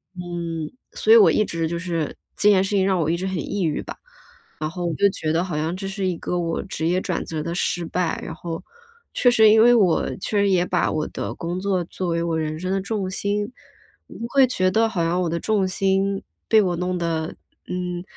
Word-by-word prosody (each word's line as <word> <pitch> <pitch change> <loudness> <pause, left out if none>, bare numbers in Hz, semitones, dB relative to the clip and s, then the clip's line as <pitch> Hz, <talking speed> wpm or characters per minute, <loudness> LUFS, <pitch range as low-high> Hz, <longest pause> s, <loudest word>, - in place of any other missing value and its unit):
嗯， 170 -3 -4 0.2
所 445 - +1
以 - - +10
我 430 - +7
一 215 - +3
直 165 -1 -2
就 170 +1 -3
是 165 -4 -3 0.2
这 210 - +3
件 190 -2 +5
事 195 - -3
情 190 -1 +3
让 190 -2 +2
我 155 - 0
一 170 - +1
直 185 - -4
很 190 -2 -2
抑 200 +5 -2
郁 155 -3 0
吧， - - -8 0.6
然 155 0 -2
后 175 +1 -5
我 170 - -1
就 200 - +4
觉 155 -4 -3
得 170 +2 +2
好 175 -5 -3
像 160 +3 -1
这 195 +1 -5
是 195 -1 -2
一 180 - 0
个 180 - -2
我 165 -1 -1
职 170 -4 -4
业 180 +2 +1
转 180 - -2
折 155 -2 -4
的 170 +1 -3
失 175 -2 -1
败， 175 0 -1
然 160 - -6
后 165 0 -6 0.5
确 245 - +4
实 220 -2 +6
因 220 +1 +6
为 240 0 +7
我 190 -7 +3
确 205 +2 -2
实 200 - +3
也 180 -2 +3
把 180 -1 +1
我 155 -1 -1
的 - - -5
工 175 +2 -4
作 190 -2 0
作 180 0 -4
为 170 0 0
我 165 -1 -1
人 155 0 -3
生 185 +1 -3
的 195 - +1
重 200 -2 -2
心， 205 +3 -2 0.6
我 - - -13
会 275 -2 +5
觉 185 -6 +1
得 225 +3 +3
好 175 -6 -1
像 170 +2 +1
我 170 - 0
的 170 +1 -1
重 205 -3 +1
心 195 +1 0 0.3
被 220 -1 +6
我 180 -3 0
弄 180 +1 -1
得， 165 -1 -2 0.3
嗯 180 -1 -3
180 Hz, 260 characters per minute, -23 LUFS, 170-195 Hz, 0.6 s, 以